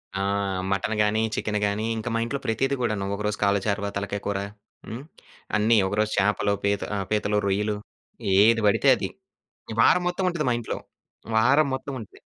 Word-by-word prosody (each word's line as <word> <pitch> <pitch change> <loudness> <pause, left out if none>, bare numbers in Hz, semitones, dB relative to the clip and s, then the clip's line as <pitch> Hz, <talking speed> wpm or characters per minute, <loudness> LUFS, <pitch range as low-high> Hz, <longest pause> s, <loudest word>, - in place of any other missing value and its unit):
ఆ! 95 - -1 0.5
మటన్ 100 +3 0
గాని, 105 +1 +1
చికెన్ 105 -1 -1
గాని. 105 +2 -1
ఇంకా 110 +1 -3
మా - - +1
ఇంట్లో 140 +4 -3
ప్రతిది 135 +5 0
కూడాను. 110 -5 -1
ఒకరోజు 105 +1 -2
కాల 100 0 +3
చారవ, 100 -1 -1
తలకాయ 100 0 -3
కూర. 100 -1 -1 0.5
హ్మ్. 120 +4 -6 0.5
అన్ని 110 +2 +4
ఒకరోజు 105 +2 0
చేపలు 100 0 +2
పీత 100 0 +1
ఆ! - - -1
పీతలు 105 -1 +1
రొయ్యలు 105 +2 0 0.6
ఏది 115 +3 +5
పడితే 100 - +2
అది. - - -3 0.7
వారం 180 - +5
మొత్తం 180 +1 -1
ఉంటది 170 -4 -2
మా - - +3
ఇంట్లో. 115 - -4 0.6
వారం 140 +7 +4
మొత్తం 135 +1 -6
ఉంటది. 110 - -12
105 Hz, 165 wpm, -25 LUFS, 100-115 Hz, 0.7 s, ఏది